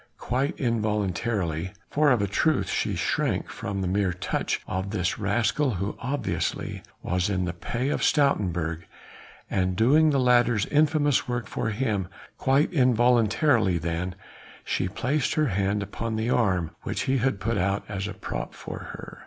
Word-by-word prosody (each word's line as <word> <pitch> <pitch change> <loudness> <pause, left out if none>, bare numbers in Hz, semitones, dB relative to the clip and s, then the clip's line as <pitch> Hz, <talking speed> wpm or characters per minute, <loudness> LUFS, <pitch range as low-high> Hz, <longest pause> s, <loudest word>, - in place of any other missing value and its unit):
Quite 130 +4 -1
involuntarily 105 - -1 0.2
for 150 0 +3
of 120 -6 +3
a - - +1
truth 155 +11 +1
she - - 0
shrank - - 0
from 100 0 -4
the 95 - -1
mere 95 0 +1
touch 90 - -2
of 95 +1 -3
this 95 -3 -1
rascal 115 +5 +1
who 100 +3 -3
obviously 130 -1 -2 0.2
was 90 +2 0
in 95 -2 0
the 85 - -3
pay 120 +9 -3
of - - -1
Stoutenburg, 85 - +1 0.6
and 95 -1 0
doing 145 - +5
the 140 -2 +2
latter's 120 -4 +3
infamous 145 -2 +2
work 120 -1 -2
for 110 - -2
him 105 -4 -1 0.3
quite 140 +6 +2
involuntarily 120 - +3
then, 85 +2 -3 0.5
she - - 0
placed 130 +9 -1
her 155 -3 +2
hand 100 +1 0
upon 110 +3 -4
the 110 +3 -1
arm 95 -10 +1
which - - -3
he 135 0 +1
had 125 -4 0
put 115 0 -1
out 100 +2 0
as 100 -1 -3
a - - -6
prop - - -5
for - - -7 0.2
her. - - -10
110 Hz, 160 wpm, -26 LUFS, 95-130 Hz, 0.6 s, doing